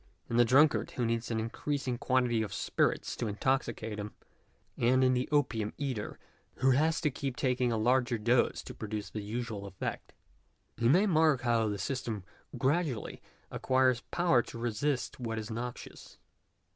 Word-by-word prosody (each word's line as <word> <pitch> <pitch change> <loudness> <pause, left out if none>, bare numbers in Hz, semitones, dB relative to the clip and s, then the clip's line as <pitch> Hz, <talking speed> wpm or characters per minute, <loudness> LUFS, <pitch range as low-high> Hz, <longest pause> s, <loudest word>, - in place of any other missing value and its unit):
In 115 - +1
the 120 - +7
drunkard 145 +6 +4
who 120 - -2
needs 115 0 -1
an 115 -1 -1
increasing 125 +2 -3
quantity 125 -3 +2
of 110 - -4
spirits - - 0
to 115 - -2
intoxicate 110 -1 -1
him, 105 0 -6 0.6
and 130 +2 +3
in 130 0 +4
the 125 0 -1
opium 125 -8 +1
eater, 130 -7 -3 0.4
who 130 +1 +3
has 155 +5 +2
to 150 -3 +1
keep 135 -1 -4
taking 125 -2 +1
a 115 - 0
larger 120 +2 +2
dose 120 +3 +2
to - - -8
produce 105 -1 -5
the 105 - -4
usual 105 -1 -4
effect, 95 -1 -5 0.6
he 115 0 +2
may 180 +9 +5
mark 160 -8 +3
how 115 -2 +2
the 105 - -2
system 110 -1 -3 0.3
gradu 145 0 +1
ally 105 - -8 0.3
acquires 130 -2 +2
power 170 -8 +3
to 115 - -10
resist 120 +5 -2
what 115 -2 -3
is 110 0 -5
noxious. 120 +2 -7
120 Hz, 165 wpm, -31 LUFS, 110-130 Hz, 0.6 s, the